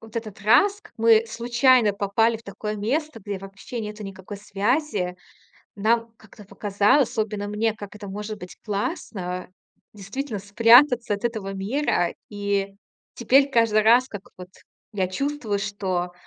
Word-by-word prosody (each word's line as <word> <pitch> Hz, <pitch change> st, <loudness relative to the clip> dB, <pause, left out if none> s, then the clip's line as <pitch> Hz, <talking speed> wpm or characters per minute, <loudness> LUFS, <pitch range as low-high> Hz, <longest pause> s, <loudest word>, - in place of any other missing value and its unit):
вот 225 Hz, -1 st, -15 dB
этот 215 Hz, -4 st, -6 dB
раз, 390 Hz, -, +4 dB
как -, -, -18 dB
мы 225 Hz, 0 st, +5 dB
случайно 235 Hz, 0 st, +3 dB
попали 205 Hz, +3 st, +1 dB
в 225 Hz, -, -16 dB
такое 210 Hz, +1 st, -5 dB
место, 260 Hz, +5 st, -2 dB
где 200 Hz, -1 st, -5 dB
вообще 195 Hz, +5 st, -8 dB
нету 210 Hz, 0 st, -6 dB
никакой 195 Hz, +1 st, -8 dB
связи, 205 Hz, -, -1 dB, 0.6 s
нам 230 Hz, +2 st, +1 dB
как-то 220 Hz, -1 st, -16 dB
показалось, 205 Hz, +6 st, +2 dB
особенно 215 Hz, -3 st, -2 dB
мне, 215 Hz, +1 st, 0 dB
как 205 Hz, -2 st, -10 dB
это 205 Hz, -1 st, -9 dB
может 210 Hz, +2 st, -6 dB
быть 180 Hz, -2 st, -10 dB
классно. 195 Hz, -, -4 dB, 0.4 s
Действительно, 215 Hz, +4 st, -5 dB
спрятаться 230 Hz, +4 st, +5 dB
от 205 Hz, -, -3 dB
этого 215 Hz, -4 st, -5 dB
мира. 195 Hz, -, 0 dB, 0.2 s
И 200 Hz, -1 st, -2 dB, 0.4 s
теперь 270 Hz, +4 st, +3 dB
каждый 230 Hz, -4 st, +3 dB
раз 240 Hz, +4 st, +5 dB
как 205 Hz, -5 st, -8 dB, 0.2 s
вот 180 Hz, 0 st, -9 dB, 0.4 s
я 190 Hz, -3 st, -1 dB
чувствую, 245 Hz, 0 st, -2 dB
что 190 Hz, -3 st, -3 dB
210 Hz, 145 wpm, -24 LUFS, 200-235 Hz, 0.6 s, мы